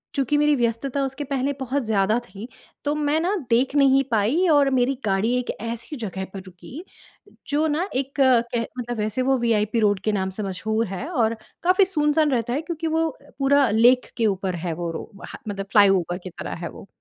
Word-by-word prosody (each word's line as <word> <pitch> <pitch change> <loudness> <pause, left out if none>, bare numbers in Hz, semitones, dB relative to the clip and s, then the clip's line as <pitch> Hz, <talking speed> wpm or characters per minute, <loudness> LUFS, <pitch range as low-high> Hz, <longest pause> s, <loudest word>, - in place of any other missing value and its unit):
चूँकि 280 +1 +1
मेरी 295 0 +3
व्यस्तता 245 +3 -1
उसके 270 +2 -4
पहले 275 +1 -1
बहुत 265 +1 -1
ज़्यादा 215 0 +2
थी 200 +3 -9 0.4
तो 290 - +1
मैं 300 +1 +1
ना 370 +5 0
देख 250 +4 +2
नहीं 275 -1 +5
पाई 235 - +2
और 290 -3 +5
मेरी 260 0 +2
गाड़ी 200 +4 +1
एक 250 - -6
ऐसी 230 +5 -5
जगह 190 -5 -4
पर 195 - -6
रुकी 185 - -11 0.6
जो 295 +2 +1
ना 315 +5 0
एक 270 +1 -2
कह 240 -3 +3 0.2
मतलब 240 -1 -4
वैसे 215 +4 -1
वो 265 +1 +2
वीआइपी 225 -1 +1
रोड 205 -2 +2
के 215 - +2
नाम 190 -2 -1
से 210 +3 -5
मशहूर 215 +4 -1
है 195 +9 -5
और 230 -9 +1 0.3
काफ़ी 370 +3 +4
सुनसान 300 -3 +1
रहता 240 -1 0
है 285 - -1
क्योंकि 330 0 -4
वो 320 0 +1 0.3
पूरा 275 -2 +4
लेक 245 +4 +4
के 230 - +1
ऊपर 190 -2 -1
है 170 - -1
वो 170 +1 -4
रो 165 - -7 0.2
ह - - -7
मतलब 195 -1 -4
फ्लाईओवर 195 -4 +4
की 185 - -6
तरह - - -6
है 170 - -3
वो। - - -12
245 Hz, 200 wpm, -23 LUFS, 210-285 Hz, 0.6 s, नहीं